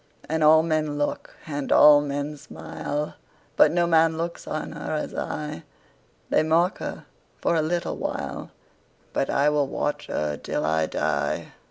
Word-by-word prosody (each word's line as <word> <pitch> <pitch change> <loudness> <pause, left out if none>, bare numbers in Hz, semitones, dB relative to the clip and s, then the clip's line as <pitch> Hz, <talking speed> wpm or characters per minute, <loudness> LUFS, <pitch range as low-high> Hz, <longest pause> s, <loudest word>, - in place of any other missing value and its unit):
And 160 0 0
all 160 +1 +7
men 155 -2 0
look, 145 0 -3
and 145 -3 -4
all 150 -1 +8
men 145 +1 -3
smile, 150 0 -5 0.4
But - - +6
no 175 +1 +2
man 165 -1 +3
looks 170 +1 -4
on 155 - -4
her - - -5
as 150 - -3
I:They 150 - -5
mark 165 +4 +2
her - - -6 0.3
for - - 0
a 160 - +3
little 170 +3 -2
while, - - -4 0.6
But 135 - 0
I 145 +2 +3
will 145 -2 +1
watch 145 +2 -3
her 75 -1 -2
till - - -3
I 80 0 +1
die. 70 -2 -1
150 Hz, 155 wpm, -25 LUFS, 145-160 Hz, 0.6 s, all